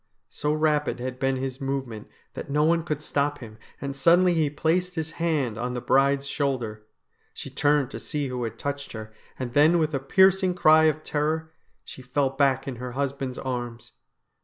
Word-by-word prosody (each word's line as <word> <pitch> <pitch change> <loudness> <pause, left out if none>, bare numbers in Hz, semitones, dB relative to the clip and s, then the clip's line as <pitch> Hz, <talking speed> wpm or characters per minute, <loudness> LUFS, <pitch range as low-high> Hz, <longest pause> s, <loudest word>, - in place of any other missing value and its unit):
So 150 +1 -2
rapid 150 -3 +1
had 125 0 -5
been 135 0 +1
his 130 0 -4
movement 135 -5 -4 0.3
that - - -7
no 150 +2 +2
one 165 +2 +3
could 150 -2 -3
stop 145 0 0
him, 110 -4 -11 0.2
and 140 0 -5
suddenly 175 +5 +4
he 160 -3 +1
placed 170 +4 0
his 160 -1 -3
hand 140 -10 0
on 125 +1 -3
the - - -2
bride's 140 +2 +2
shoulder. 120 -7 -2 0.5
She - - -8
turned 145 -2 +1
to - - -6
see 145 -2 -3
who 125 -1 -4
had 115 -1 -5
touched 140 +2 -4
her, 110 -1 -8 0.2
and 125 -2 -5
then 155 +5 +5
with 155 -2 0
a 135 - 0
piercing 190 +5 +3
cry 160 -2 +6
of 155 0 +1
terror 160 +2 -1 0.3
she - - -10
fell 130 +2 0
back 135 -1 +1
in 130 -3 -4
her 125 0 -6
husband's 135 -1 -3
arms. 120 -3 -5
140 Hz, 185 wpm, -25 LUFS, 130-155 Hz, 0.5 s, cry